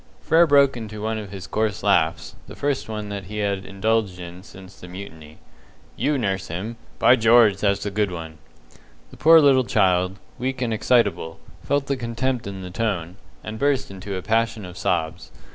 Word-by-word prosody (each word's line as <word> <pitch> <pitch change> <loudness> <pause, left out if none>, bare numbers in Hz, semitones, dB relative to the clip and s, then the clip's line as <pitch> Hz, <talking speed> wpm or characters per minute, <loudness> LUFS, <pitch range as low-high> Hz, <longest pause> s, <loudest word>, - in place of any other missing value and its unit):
Frere 165 +1 +4
broke 140 -2 +5
into 105 -3 -7
one 110 0 -1
of 105 -2 -8
his 95 -1 -8
coarse 110 -1 -2
laughs, - - +1
the - - -10
first 140 -4 -2
one 105 -1 -5
that 100 -2 -5
he 105 +3 -7
had 100 -2 -1
indulged 100 -1 0
in 90 0 -9
since 95 -1 -14
the 90 - -10
mutiny. 80 -5 -10 0.6
"You 150 0 0
nurse 95 -6 -2
him! 100 +8 -5 0.2
By 125 - +6
George, 115 -3 +5
that's 100 0 0
a 105 - -2
good 105 0 0
one!" 80 -2 -8 0.7
The - - -13
poor 165 +2 +7
little 135 -3 +5
child, 95 -4 +1 0.2
weak 130 +1 -2
and 120 -3 -1
excitable, 105 -8 +1 0.2
felt 140 +6 0
the 140 -1 -1
contempt 125 0 -2
in 95 -1 -7
the 90 - -7
tone, 90 -4 -2 0.3
and 110 0 -6
burst 135 -2 0
into 100 +1 -6
a 95 - -5
passion 115 0 0
of 90 0 -10
sobs. 80 -10 -2
105 Hz, 185 wpm, -23 LUFS, 95-120 Hz, 0.7 s, poor